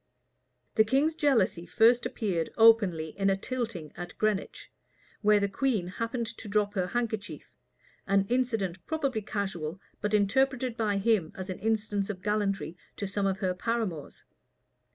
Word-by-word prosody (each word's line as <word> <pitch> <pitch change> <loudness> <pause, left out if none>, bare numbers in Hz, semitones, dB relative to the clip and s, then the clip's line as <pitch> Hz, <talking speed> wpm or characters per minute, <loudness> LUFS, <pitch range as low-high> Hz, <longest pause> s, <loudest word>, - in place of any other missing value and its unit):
The 220 - +7
king's 275 +8 +2
jealousy 235 - +1
first 235 +6 +4
appeared 180 -7 -2
openly 205 -9 +5
in 195 0 +3
a 195 - +2
tilting 220 - -4
at 175 0 -8
Greenwich, 215 -3 -2 0.5
where 210 -1 +5
the 200 - +1
queen 215 -2 0
happened 230 +6 -3
to 225 - -8
drop 205 0 +1
her 185 -3 0
handkerchief, 220 -1 -4 0.5
an 195 0 +3
incident 225 -8 -1
probably 275 -8 -1
casual, 190 -5 -3 0.2
but 210 +1 +1
interpreted 255 +4 +2
by 215 -4 0
him 200 -5 +2
as 190 0 -5
an 185 - -6
instance 215 -2 -1
of 185 -3 -5
gallantry 200 -4 -1 0.2
to 200 - -4
some 200 0 0
of 190 +1 -2
her 185 -2 +1
paramours. 195 -6 -3
210 Hz, 150 wpm, -29 LUFS, 190-230 Hz, 0.5 s, The